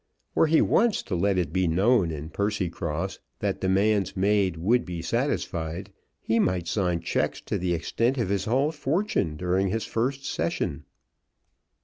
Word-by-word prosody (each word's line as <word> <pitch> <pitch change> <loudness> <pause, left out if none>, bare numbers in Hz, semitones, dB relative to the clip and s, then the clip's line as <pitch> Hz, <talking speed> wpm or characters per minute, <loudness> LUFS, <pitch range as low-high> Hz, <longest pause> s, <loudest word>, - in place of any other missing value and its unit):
Were - - +4
he 160 +1 +4
once 230 0 +2
to 95 - -3
let 95 +2 +1
it 85 -4 -1
be 95 -1 +2
known 95 +3 +3
in 80 0 -6
Percycross 95 -3 -2 0.2
that - - -2
demands 95 +1 +2
made 95 -3 +2
would 115 +9 +2
be 85 -2 -5
satisfied, 95 - -2 0.3
he 115 +1 0
might 90 -4 +1
sign 90 -5 0
cheques - - -1
to - - -3
the 90 -1 0
extent 115 +10 0
of 120 -6 0
his 100 -1 0
whole 135 +7 +2
fortune, 145 - -1
during 90 +3 +1
his 110 +4 -1
first 135 +4 -2
session. 85 -9 -2
95 Hz, 155 wpm, -26 LUFS, 85-115 Hz, 0.3 s, Were